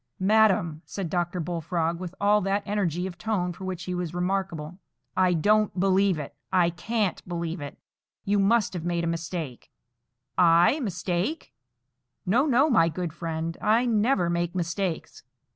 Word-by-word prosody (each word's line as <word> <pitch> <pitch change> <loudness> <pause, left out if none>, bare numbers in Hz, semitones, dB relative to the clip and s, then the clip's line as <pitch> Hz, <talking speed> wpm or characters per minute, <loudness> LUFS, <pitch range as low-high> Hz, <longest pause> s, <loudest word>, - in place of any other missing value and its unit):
"Madam," 190 -6 +3
said 185 -5 -5
Dr. 175 0 -1
Bullfrog, 170 0 -2
with 180 0 -7
all 210 +1 +4
that 195 +2 0
energy 185 -4 -1
of 175 -2 -7
tone 180 -3 -1
for 190 - -9
which 185 -2 -4
he 180 - -4
was 175 -2 -3
remarkable, 180 -2 -2 0.4
"I 185 -1 +3
don't 210 +4 +2
believe 195 -1 +3
it,—I 170 +4 -1
can't 205 +3 -1
believe 170 -1 -3
it. 145 +1 -7 0.5
You 205 +1 +2
must 205 +1 +3
have 175 -3 -4
made 170 0 -1
a 165 0 0
mistake." 165 -6 -6 0.7
"I 175 - +5
mistake! 195 - -2 0.7
No, 245 +11 +3
no, 270 +2 +4
my 195 - +4
good 170 0 -4
friend; 165 0 -4
I 225 +4 +3
never 220 -4 +2
make 170 +1 -1
mistakes. 175 0 -3
180 Hz, 150 wpm, -26 LUFS, 170-200 Hz, 0.7 s, I